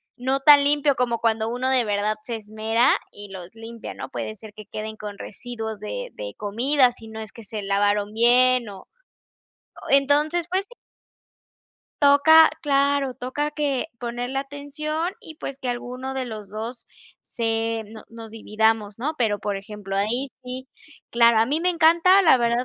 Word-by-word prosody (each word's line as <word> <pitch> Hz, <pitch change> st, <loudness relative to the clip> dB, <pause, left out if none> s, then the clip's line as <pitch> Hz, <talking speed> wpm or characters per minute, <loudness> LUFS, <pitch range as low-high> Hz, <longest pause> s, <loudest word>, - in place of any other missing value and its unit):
no 260 Hz, +2 st, 0 dB
tan 285 Hz, +1 st, +7 dB
limpio 290 Hz, 0 st, +3 dB
como 240 Hz, -2 st, 0 dB
cuando 225 Hz, -1 st, 0 dB
uno 250 Hz, +2 st, -1 dB
de 260 Hz, -2 st, +3 dB
verdad 210 Hz, 0 st, 0 dB
se 230 Hz, +1 st, -5 dB
esmera, 220 Hz, +3 st, 0 dB, 0.2 s
y 205 Hz, -1 st, -10 dB
los 180 Hz, -2 st, -8 dB
limpia, 225 Hz, 0 st, -9 dB
¿no? -, -, -7 dB
Puede 215 Hz, -, -5 dB
ser 215 Hz, 0 st, -12 dB
que 215 Hz, 0 st, -11 dB
queden 215 Hz, +1 st, -6 dB
con 205 Hz, -1 st, -8 dB
residuos 220 Hz, -1 st, -7 dB
de -, -, -5 dB
de -, -, -7 dB
comida, 245 Hz, +6 st, +2 dB
si 225 Hz, -, -13 dB
no 220 Hz, 0 st, -8 dB
es 220 Hz, -2 st, -8 dB
que 230 Hz, -, -12 dB
se 210 Hz, 0 st, -6 dB
lavaron 205 Hz, +1 st, +1 dB
bien 245 Hz, +1 st, +4 dB
o 195 Hz, -2 st, -12 dB, 1.0 s
Entonces, 295 Hz, +5 st, +3 dB
pues 380 Hz, +2 st, 0 dB
sí. -, -, -15 dB, 1.3 s
Toca 305 Hz, +3 st, +7 dB
claro, 280 Hz, -2 st, +1 dB
toca 275 Hz, +5 st, -3 dB
que 295 Hz, -2 st, -1 dB
ponerle 245 Hz, +2 st, -4 dB
atención, 290 Hz, +4 st, -4 dB
y, 320 Hz, -8 st, -11 dB
pues, 275 Hz, -3 st, -7 dB
que 260 Hz, -3 st, -5 dB
alguno 250 Hz, +2 st, -5 dB
de 265 Hz, -1 st, -3 dB
los 215 Hz, -4 st, -8 dB
dos 225 Hz, +3 st, -6 dB, 0.4 s
se 225 Hz, -1 st, -2 dB
no 220 Hz, +1 st, -12 dB
nos 230 Hz, -1 st, -10 dB
dividamos, 220 Hz, -1 st, 0 dB
¿no? 300 Hz, +6 st, -2 dB
Pero, 220 Hz, -5 st, +1 dB
por 205 Hz, -1 st, -3 dB
ejemplo, 195 Hz, -1 st, -7 dB
ahí 235 Hz, +7 st, 0 dB
sí, 255 Hz, +1 st, -7 dB, 0.4 s
claro, 235 Hz, -1 st, +5 dB
a 225 Hz, -, +3 dB
mí 295 Hz, +5 st, 0 dB
me 360 Hz, -, +2 dB
encanta, 340 Hz, +3 st, +5 dB
la 320 Hz, -7 st, +6 dB
verdad, 235 Hz, +1 st, +1 dB
240 Hz, 170 wpm, -23 LUFS, 220-280 Hz, 1.3 s, tan